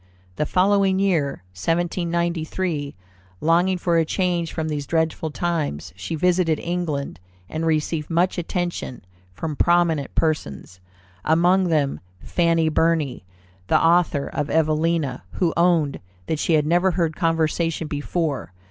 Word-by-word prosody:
The 150 - 0
following 195 0 +3
year, 165 - 0
1793, 170 - -1 0.4
longing 175 +4 +2
for 170 -1 +1
a - - +3
change 175 -1 -1
from 160 -1 -3
these 145 -3 -3
dreadful 160 -1 0
times, 155 - -2
she 95 - -4
visited 175 -1 +2
England, 160 - -3 0.3
and 160 - -3
received 155 0 0
much 175 +2 +1
attention 175 - -4 0.3
from 155 - -5
prominent 170 -3 +2
persons, 90 - -2 0.4
among 175 +4 +3
them 150 -5 +1 0.2
Fanny 165 - +1
Burny, 155 - +1 0.4
the - - +4
author 165 -4 +3
of 145 0 -3
Evelina, 155 -3 +1
who 170 -3 0
owned 170 -4 +2 0.3
"that 160 - -2
she 165 - +1
had 150 -2 +3
never 175 +4 +3
heard 165 -3 0
conversation 165 -1 0
before. 145 - -2
165 Hz, 125 wpm, -23 LUFS, 150-175 Hz, 0.4 s, the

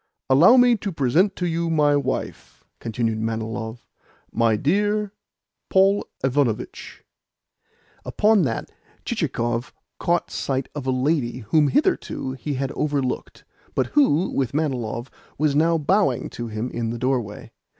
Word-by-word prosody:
"Allow 175 - +7
me 245 -1 +6
to 200 -1 -4
present 160 +7 +2
to 180 - -2
you 170 0 -1
my 150 -2 +3
wife," 145 - -4 0.2
continued 115 -1 -2
Manilov. 110 +1 -4 0.5
"My 115 -1 +2
dear 205 - 0 0.6
Paul 195 +1 +3 0.2
Ivanovitch." 130 -4 -1 1.0
Upon 215 -1 +3
that 125 -8 -2 0.3
Chichikov 120 +1 -2 0.3
caught 175 0 0
sight 135 -1 -2
of 140 -3 -6
a - - +2
lady 130 -2 0
whom 155 -2 +5
hitherto 290 - 0
he 135 +2 -4
had 135 +1 -2
overlooked, 140 -4 -2 0.3
but - - +2
who, 190 - +3
with 135 0 -1
Manilov, 125 -5 -2 0.3
was 150 -1 +1
now 165 +2 +3
bowing 160 - +1
to 120 - -5
him 110 +3 -4
in 115 -1 -2
the 120 - -3
doorway. 125 -4 -2
140 Hz, 130 wpm, -23 LUFS, 120-170 Hz, 1.0 s, Allow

